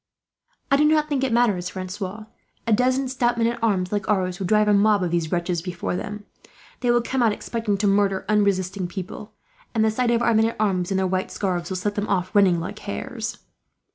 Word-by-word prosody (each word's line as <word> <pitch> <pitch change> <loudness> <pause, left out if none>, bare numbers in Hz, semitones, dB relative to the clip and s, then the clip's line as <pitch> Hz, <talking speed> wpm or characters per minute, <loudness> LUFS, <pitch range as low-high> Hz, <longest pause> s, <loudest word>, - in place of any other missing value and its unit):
"I 275 - +6
do 300 - +4
not 305 0 +3
think 275 -3 0
it 265 - 0
matters, 210 -7 +2
Francois. 190 +3 -6 0.4
A 230 - +2
dozen 255 +4 +2
stout 245 -2 0
men 230 - +2
at 235 0 -1
arms, 185 -5 +1
like 205 -2 -2
ours, 185 -2 0
would 190 - -2
drive 210 +1 +3
a 210 - +4
mob 205 -1 +4
of 175 - -1
these 170 -2 -1
wretches 175 -1 -1
before 180 0 -4
them. 210 +2 -6 0.5
They 245 - -1
will 240 0 +3
come 260 +1 -1
out 230 -2 +4
expecting 220 -2 -2
to 205 - -1
murder 195 -1 +2
unresisting 195 -3 +1
people; 190 +4 -7 0.4
and 220 -1 +3
the 220 - +3
sight 245 +2 0
of 235 0 +2
our 235 - +3
men 220 0 +4
at - - -7
arms, 185 -4 +1
in 195 - 0
their 190 - +1
white 185 0 -1
scarves, 180 -3 -2
will 190 - -2
set 205 +3 -2
them 205 0 -2
off 185 -2 0
running 190 -4 +5
like 195 +5 -6
hares." 225 +2 -5
205 Hz, 225 wpm, -23 LUFS, 185-230 Hz, 0.5 s, I